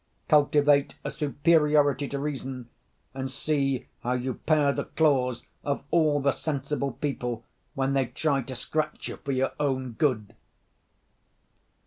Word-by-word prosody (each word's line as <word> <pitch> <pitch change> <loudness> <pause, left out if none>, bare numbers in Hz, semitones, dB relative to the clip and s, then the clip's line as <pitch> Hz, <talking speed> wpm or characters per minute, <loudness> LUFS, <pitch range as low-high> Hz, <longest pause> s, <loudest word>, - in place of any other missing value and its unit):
Cultivate 145 -1 +4
a - - -3
superiority 150 -2 +3
to 140 - -4
reason, 135 -4 -4 0.4
and 135 0 -4
see 135 -2 0
how 125 - -1
you 125 +1 -1
pare 150 -1 +2
the - - -3
claws 130 -6 +1 0.2
of 140 -1 -2
all 155 -3 +3
the 140 0 +2
sensible 140 -2 -2
people 125 -5 -3 0.3
when 135 0 0
they 135 -2 +2
try 140 +3 0
to 130 +1 -7
scratch 155 +5 -2
you - - -6
for 140 - -4
your 130 0 +1
own 130 -3 0
good! 115 -4 0
140 Hz, 135 wpm, -27 LUFS, 130-150 Hz, 0.4 s, Cultivate